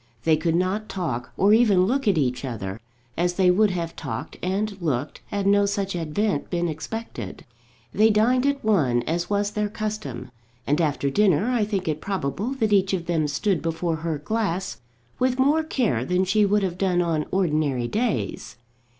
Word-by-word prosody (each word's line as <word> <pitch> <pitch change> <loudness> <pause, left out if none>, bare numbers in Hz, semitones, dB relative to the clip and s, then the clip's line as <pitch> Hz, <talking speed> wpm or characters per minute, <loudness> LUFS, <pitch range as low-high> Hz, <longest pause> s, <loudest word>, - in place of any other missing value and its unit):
They 160 +2 +4
could 160 +1 0
not 190 +5 -1
talk, 145 -11 -3
or 200 +3 +5
even 210 -5 +5
look 270 +4 0
at 195 -4 +3
each 125 -3 0
other, 110 -6 -5 0.4
as 175 +1 0
they 185 -1 +4
would 210 +3 +4
have 170 -3 -3
talked - - -5
and 200 +3 -1
looked 145 -3 -2
had 200 -1 -2
no 200 0 +4
such 200 -2 -2
advent 170 +1 -1
been 175 -1 0
expected. 160 - -6 0.5
They 215 +2 +5
dined 245 +5 +3
at 280 -4 -1
one, 135 - +2
as 170 +2 -2
was 205 0 0
their 210 0 -1
custom, 200 - -5 0.3
and 150 +4 +1
after 145 -3 0
dinner 205 - +3
I 235 -4 +2
think 195 -3 -2
it 155 -1 -1
probable 195 - -2
that 220 -5 +1
each 195 -1 +3
of 175 -3 -1
them 160 -3 0
stood 155 +5 0
before 165 0 -1
her 160 0 -2
glass 185 - -2 0.4
with 255 0 +1
more 285 +4 +3
care 245 - 0
than 180 +7 +1
she 205 +2 +3
would 205 0 +2
have 180 -1 -2
done 180 -2 +2
on 160 -3 -1
ordinary 150 -9 +1
days. 220 - -2
185 Hz, 180 wpm, -24 LUFS, 155-210 Hz, 0.5 s, or